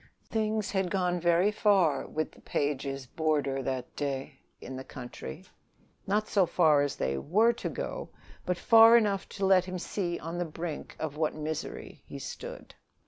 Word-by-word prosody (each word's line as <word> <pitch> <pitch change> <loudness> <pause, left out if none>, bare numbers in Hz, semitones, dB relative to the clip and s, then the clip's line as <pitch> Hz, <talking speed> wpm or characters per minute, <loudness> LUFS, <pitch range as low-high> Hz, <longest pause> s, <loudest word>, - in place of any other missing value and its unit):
Things 215 -1 0
had 190 -2 0
gone 180 -1 0
very 175 +4 +3
far 195 -9 +3
with 155 0 -3
the - - -19
Pages' 135 -2 -2
roomer 145 -4 +1
that 130 -1 -4
day 135 -1 -4 0.2
in 130 - -8
the 130 - -6
country; 120 - -8 0.6
not 210 +2 +1
so 195 -4 +3
far 155 -5 +4
as 145 -1 -1
they 65 +1 -1
were 215 - +3
to 235 - -4
go, - - -5 0.3
but 180 -1 -1
far 225 +4 +8
enough 205 -4 0
to 195 - -2
let 190 -1 +5
him 185 0 -4
see 175 -1 -2
on 165 +2 -5
the - - +1
brink 160 0 -6
of 150 -2 -4
what 155 -1 0
misery 155 0 -5
he - - -7
stood. - - -8
170 Hz, 170 wpm, -29 LUFS, 145-195 Hz, 0.6 s, far